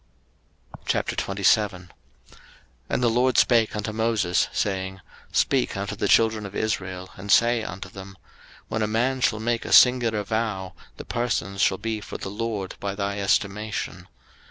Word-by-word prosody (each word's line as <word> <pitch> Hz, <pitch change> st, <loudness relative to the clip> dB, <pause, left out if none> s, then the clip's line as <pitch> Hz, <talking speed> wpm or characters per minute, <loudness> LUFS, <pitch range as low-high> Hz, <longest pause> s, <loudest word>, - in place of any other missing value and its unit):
03:027:001 95 Hz, -2 st, +1 dB, 1.0 s
And 125 Hz, -, 0 dB
the -, -, +4 dB
LORD 125 Hz, +2 st, +2 dB
spake 115 Hz, -4 st, +4 dB
unto 105 Hz, 0 st, -3 dB
Moses, 110 Hz, -5 st, +1 dB
saying, 95 Hz, -1 st, -2 dB, 0.4 s
03:027:002 -, -, -12 dB
Speak -, -, +1 dB
unto -, -, -3 dB
the -, -, -1 dB
children 110 Hz, -1 st, +3 dB
of 100 Hz, -, -12 dB
Israel, 95 Hz, -4 st, -3 dB
and 100 Hz, +1 st, -5 dB
say 120 Hz, 0 st, +4 dB
unto 95 Hz, -3 st, -6 dB
them, 95 Hz, 0 st, -11 dB, 0.5 s
When 110 Hz, -, -2 dB
a 105 Hz, -, +1 dB
man 125 Hz, +4 st, 0 dB
shall 110 Hz, -3 st, +2 dB
make 115 Hz, +1 st, -1 dB
a -, -, -6 dB
singular 120 Hz, -4 st, +5 dB
vow, 105 Hz, -3 st, -2 dB, 0.2 s
the -, -, -8 dB
persons 100 Hz, -5 st, -2 dB
shall 95 Hz, -, +3 dB
be 110 Hz, 0 st, -3 dB
for -, -, -7 dB
the -, -, -6 dB
LORD 105 Hz, -3 st, -4 dB
by 100 Hz, -1 st, -3 dB
thy 100 Hz, 0 st, -2 dB
estimation. 100 Hz, +2 st, -1 dB
105 Hz, 155 wpm, -24 LUFS, 95-115 Hz, 1.0 s, singular